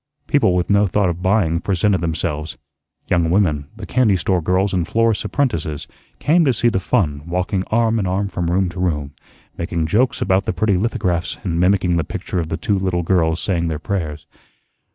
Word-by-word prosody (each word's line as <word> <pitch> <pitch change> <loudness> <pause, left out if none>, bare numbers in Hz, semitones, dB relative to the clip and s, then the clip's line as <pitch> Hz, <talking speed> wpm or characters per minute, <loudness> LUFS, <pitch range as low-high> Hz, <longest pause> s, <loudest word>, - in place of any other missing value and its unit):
People 135 -11 +2
with 90 -1 0
no 100 0 +4
thought 95 0 +1
of 85 +1 -4
buying 90 -4 +2
presented 95 0 +1
themselves. 80 -2 -3 0.5
Young 85 -2 +2
women 80 -6 +1
the 110 -2 -8
candy 110 -6 +2
store 90 +1 0
girls 95 +4 +1
and 90 -3 0
florist's 115 -1 +1
apprentices 85 - -2 0.3
came 165 +4 +3
to 135 -4 +3
see 120 +1 +2
the 95 - 0
fun, 85 - 0
walking 90 +2 -1
arm 115 0 +2
in 95 - -1
arm 95 +2 0
from 90 -3 -3
room 95 +2 +2
to 90 +2 -8
room, 75 -6 -1 0.5
making 85 -1 -1
jokes 115 +11 +1
about 95 0 +1
the - - -1
pretty 100 +2 +1
lithographs 90 -4 -1
and 85 -3 -1
mimicking 90 -1 +2
the 85 - +1
picture 90 - -4
of 80 -2 -3
the 80 - -2
two 100 0 0
little 90 -2 -1
girls 80 -2 +1
saying 85 -4 -1
their 80 -2 -2
prayers. 80 -4 -4
90 Hz, 195 wpm, -20 LUFS, 85-100 Hz, 0.5 s, no